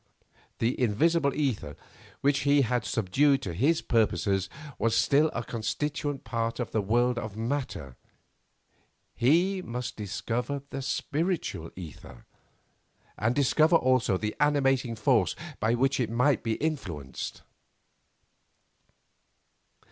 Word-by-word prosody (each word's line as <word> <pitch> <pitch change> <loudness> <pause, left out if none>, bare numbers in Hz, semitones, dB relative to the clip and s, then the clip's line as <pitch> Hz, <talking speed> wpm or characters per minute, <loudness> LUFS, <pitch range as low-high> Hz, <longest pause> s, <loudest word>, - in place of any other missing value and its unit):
The 120 +3 0
invisible 140 +7 +2
ether 110 - -2 0.4
which 140 -1 +3
he 140 0 +4
had 125 +1 0
subdued 135 +7 +2
to 90 - -4
his 145 - +2
purposes 100 -4 +1 0.3
was 115 0 +2
still 140 +7 +4
a 120 - -3
constituent 140 +6 -3
part 115 0 -2
of 120 - -3
the 110 - +1
world 120 +4 +2
of 110 -1 -6
matter; 110 - -3 1.2
he 175 +10 +2
must 125 -5 -5
discover 120 +6 -3
the 135 - -4
spiritual 150 - -2
ether, 80 -8 -10 0.9
and 115 +4 0
discover 155 +4 +4
also 130 - +3
the 105 +2 -3
animating 135 -4 +2
force 110 -2 +2 0.2
by 110 +3 +2
which 135 +3 +1
it 120 -4 0
might 125 +4 +2
be 115 - -1
influenced. 95 - -4
125 Hz, 115 wpm, -28 LUFS, 110-140 Hz, 1.2 s, he